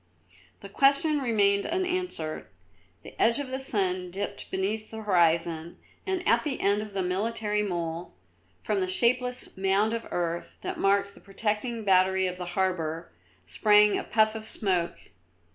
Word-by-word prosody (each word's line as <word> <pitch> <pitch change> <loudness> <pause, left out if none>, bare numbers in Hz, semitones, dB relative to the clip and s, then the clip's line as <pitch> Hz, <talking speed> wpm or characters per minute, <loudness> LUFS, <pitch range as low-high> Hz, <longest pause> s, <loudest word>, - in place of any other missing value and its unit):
The - - -8
question 285 +2 +3
remained 200 -6 +2
unanswered; 360 - -3 0.6
the - - -11
edge 230 +2 +4
of 285 -2 -4
the 260 +1 -3
sun 185 -8 -1
dipped 195 +3 -5
beneath 210 +3 -2
the 220 0 -7
horizon 170 -3 +1 0.3
and 375 -1 -2
at - - +4
the 285 -4 -3
end 200 +1 +2
of 210 -1 -8
the 195 -1 -1
military 210 +3 -1
mole, 170 - -4 0.5
from 205 - 0
the 185 - 0
shapeless 250 +5 0
mound 195 +3 +1
of 230 0 -4
earth 170 -1 -3
that - - -5
marked 200 0 +2
the - - -17
protecting 215 +3 -3
battery 190 0 +3
of 180 0 -3
the 180 - -5
harbour, 170 -3 -1 0.3
sprang 210 - +4
a - - -2
puff 215 -1 +2
of 220 -1 -6
smoke. 185 -5 -1
200 Hz, 155 wpm, -27 LUFS, 185-230 Hz, 0.6 s, edge